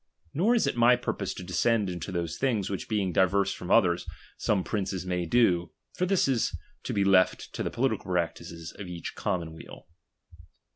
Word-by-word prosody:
Nor 210 - +3
is 230 - +3
it - - 0
ray 120 +1 +5
purpose 100 -5 -3
to - - -7
descend 100 +4 +1
into 90 0 -5
those 85 -2 -2
things, 110 -8 0
which 95 - -4
being 100 -5 0
diverse 95 +2 +3
from 90 - -8
others, 90 -6 +3 0.3
some 100 -3 0
princes 95 -3 -3
may 90 -1 -1
do, 90 -5 +3 0.2
for 180 - -1
this 195 -5 +3
is 130 -4 0 0.3
to - - -2
be 100 - +1
left 95 -1 +3
to - - -4
the - - -1
political - - -1
practices 85 -1 -3
of 100 - -6
each 85 -2 -6
commonweal. 80 -3 -5
95 Hz, 180 wpm, -28 LUFS, 90-115 Hz, 0.3 s, ray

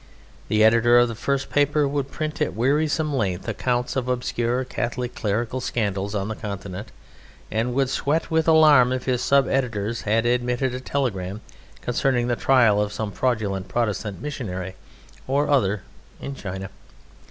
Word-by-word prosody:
The 110 0 +3
editor 115 +2 +5
of 120 0 +5
the - - -4
first 140 +4 -2
paper 145 0 +2
would 140 -1 -2
print 155 +1 -4
at 150 - 0
wearisome 150 +5 +1
length 95 -7 -1
accounts 125 -1 -1
of 130 -2 -1
obscure 125 0 -1
Catholic 125 -1 -3
clerical 120 -2 -2
scandals 100 -4 -2
on 100 -1 -1
the 110 - -3
Continent, 100 -2 -6 0.6
and 115 +3 -1
would 135 -1 +2
sweat 145 +5 -1
with 160 0 +2
alarm 150 -6 +6
if 130 -1 -2
his 125 -2 0
sub 140 -1 +3
editors 115 -4 -1
had 115 +2 +1
admitted 125 +1 0
a 125 - -3
telegram 110 -7 -2 0.4
concerning 120 0 +1
the 120 - +2
trial 115 -6 +4
of 105 0 -1
some 105 0 -4
fraudulent 100 -6 -1
Protestant 105 -2 -2
missionary 95 -11 -5 0.5
or 140 +2 +1
other 105 -8 +2 0.4
in 140 - -5
China. 95 -5 -6
120 Hz, 155 wpm, -23 LUFS, 105-135 Hz, 0.6 s, alarm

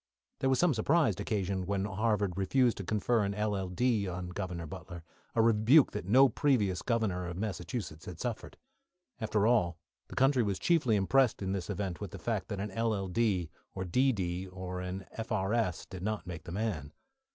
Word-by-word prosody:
There 135 - +1
was 130 - +3
some 175 -4 +4
surprise 120 - +2
occasioned 95 -3 -1
when 100 -1 0
Harvard 105 -2 0
refused 120 +6 +2
to 100 - -4
confer 110 +3 +1
an 100 0 -1
LL.D. 105 +2 0
on 90 0 -4
Governor 90 -2 -4
Butler, 85 0 -8 0.3
a 115 - +4
rebuke 115 +6 +5
that 105 -3 -5
no 130 +6 +7
previous 110 -8 +1
Governor 105 -7 0
of 85 0 -5
Massachusetts 95 -4 -4
had 90 -3 -8
suffered. 120 -3 -4 0.6
After 110 -2 +1
all, 90 -8 +3 0.3
the - - -10
country 135 -1 +4
was 100 -4 0
chiefly 150 -10 +2
impressed 110 +3 +3
in 95 - -1
this 95 -3 -3
event 95 -5 -3
with - - -4
the - - -8
fact - - -2
that 100 - -4
an 105 +1 -3
LL.D., 100 -4 0 0.2
or 95 - -3
a - - -6
D.D., 95 -5 +1
or 90 0 -6
an 95 +1 -5
F.R.S., 110 -4 -1
did 95 -1 -9
not 105 -2 -2
make 85 -2 -7
the 85 - -7
man. 90 -8 -3
100 Hz, 180 wpm, -31 LUFS, 90-115 Hz, 0.6 s, no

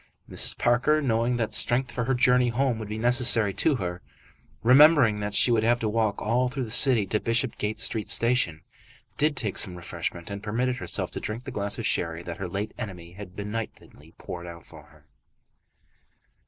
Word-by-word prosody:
Mrs. - - +2
Parker, 120 +6 +2
knowing 120 -3 0
that 110 -2 -3
strength 120 +3 +2
for 120 0 -3
her 130 +1 0
journey 125 0 +3
home 125 -1 -1
would 110 - -6
be 105 - -5
necessary 120 -3 +4
to 140 - +1
her, 90 -6 -5 0.6
remembering 130 -3 +5
that 105 0 -4
she 125 - +3
would 115 -2 +2
have 120 +2 +2
to 110 - -2
walk 110 -1 -1
all 125 +4 0
through 130 +1 -4
the 110 - -7
city 120 -4 +5
to 105 +3 -1
the - - -21
Bishopsgate 115 -2 -1
Street 110 -1 0
station, 115 -10 +1 0.5
did 150 -1 0
take 105 -6 -1
some 90 - 0
refreshment, 85 +1 -6
and 100 0 -6
permitted 120 +4 -2
herself - - -2
to - - -5
drink 110 +3 -6
the - - -8
glass 100 0 -1
of - - -5
sherry 85 0 -1
that 85 -1 -7
her 95 - -5
late 100 +4 -4
enemy 90 -5 -8
had 90 0 -11
benignantly 105 +3 -8
poured 90 0 -8
out 85 -1 -11
for - - -15
her. - - -23
110 Hz, 195 wpm, -25 LUFS, 100-125 Hz, 0.6 s, remembering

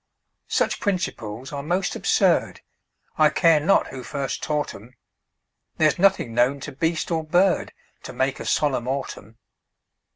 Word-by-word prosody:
Such - - 0
principles 135 - -3
are 140 - -3
most 180 +6 -1
absurd, - - +1 0.6
I 155 -1 +6
care 165 0 +4
not 180 +7 +2
who 130 - -7
first 135 +1 -4
taught 150 -1 -2
'em; 115 +6 -14 0.8
There's 155 -2 +2
nothing 190 -11 +2
known 125 +4 +2
to 145 - -6
beast 160 +5 -2
or 160 -1 0
bird 175 +3 +2 0.3
To - - -6
make 135 0 -1
a - - -6
solemn 130 -5 0
autumn. 130 -5 -5
145 Hz, 140 wpm, -23 LUFS, 130-165 Hz, 0.8 s, I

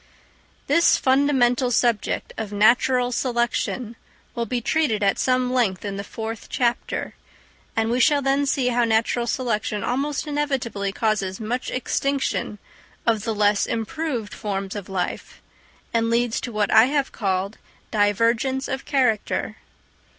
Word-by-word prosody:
This 335 - +4
fundamental 260 -2 +3
subject 235 -2 0
of 215 -2 -5
natural 245 +4 +3
selection 240 -1 -1 0.4
will 235 -1 -3
be 245 +3 -1
treated 235 -4 0
at 195 - +2
some 255 -1 +1
length 210 -7 +1
in 200 -1 -3
the 200 - -4
fourth 225 +1 -6
chapter; 240 -2 -1 0.6
and 225 0 +1
we 245 - +1
shall 290 +3 +4
then 275 +1 +2
see 265 -3 +1
how 240 0 +2
natural 230 +1 +1
selection 215 -4 -1
almost 275 +4 -1
inevitably 270 -9 -2
causes 200 -3 -1
much 235 +3 -3
extinction 265 -3 -1 0.5
of 220 -3 +1
the 225 -2 -1
less 205 -1 +2
improved 230 0 -3
forms 195 -1 -4
of 200 -2 -6
life, 185 -2 -4 0.5
and 230 0 +1
leads 235 0 +1
to 245 - -5
what 210 -2 0
I 220 +1 +8
have 280 0 0
called 195 0 -2 0.3
divergence 230 +6 +1
of 265 0 -4
character. 250 -7 0
235 Hz, 135 wpm, -23 LUFS, 210-260 Hz, 0.6 s, I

